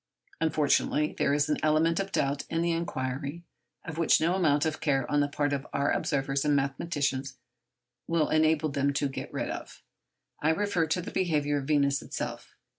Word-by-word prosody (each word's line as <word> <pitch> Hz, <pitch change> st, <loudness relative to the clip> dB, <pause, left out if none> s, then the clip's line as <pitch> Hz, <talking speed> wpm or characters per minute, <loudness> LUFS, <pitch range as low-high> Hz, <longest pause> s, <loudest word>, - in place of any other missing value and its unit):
Unfortunately, 150 Hz, -1 st, +1 dB
there 140 Hz, -, +2 dB
is 145 Hz, +1 st, +2 dB
an 150 Hz, -, +1 dB
element 155 Hz, +3 st, +2 dB
of 195 Hz, 0 st, -3 dB
doubt 140 Hz, -3 st, 0 dB
in 165 Hz, +1 st, 0 dB
the 170 Hz, -, +1 dB
inquiry, 145 Hz, -1 st, -3 dB, 0.4 s
of 160 Hz, -1 st, -6 dB
which 165 Hz, -, +4 dB
no 170 Hz, +3 st, +2 dB
amount 155 Hz, -5 st, +2 dB
of 160 Hz, -1 st, -2 dB
care 135 Hz, -5 st, +1 dB
on 145 Hz, -, +3 dB
the 145 Hz, -, +2 dB
part 145 Hz, 0 st, -1 dB
of 140 Hz, 0 st, -3 dB
our 140 Hz, 0 st, +1 dB
observers 135 Hz, -1 st, 0 dB
and 150 Hz, -1 st, +2 dB
mathematicians 135 Hz, -1 st, -1 dB, 0.7 s
will 165 Hz, -2 st, +1 dB
enable 155 Hz, 0 st, +3 dB
them 140 Hz, 0 st, 0 dB
to 140 Hz, 0 st, 0 dB
get 135 Hz, -, -6 dB
rid. -, -, -3 dB, 0.9 s
I 155 Hz, -, +2 dB
refer 170 Hz, -1 st, +1 dB
to 175 Hz, +3 st, -1 dB
the -, -, -6 dB
behaviour 150 Hz, -5 st, +1 dB
of 135 Hz, -, -6 dB
Venus 140 Hz, -2 st, +2 dB
herself. -, -, -6 dB
150 Hz, 180 wpm, -28 LUFS, 140-160 Hz, 0.9 s, which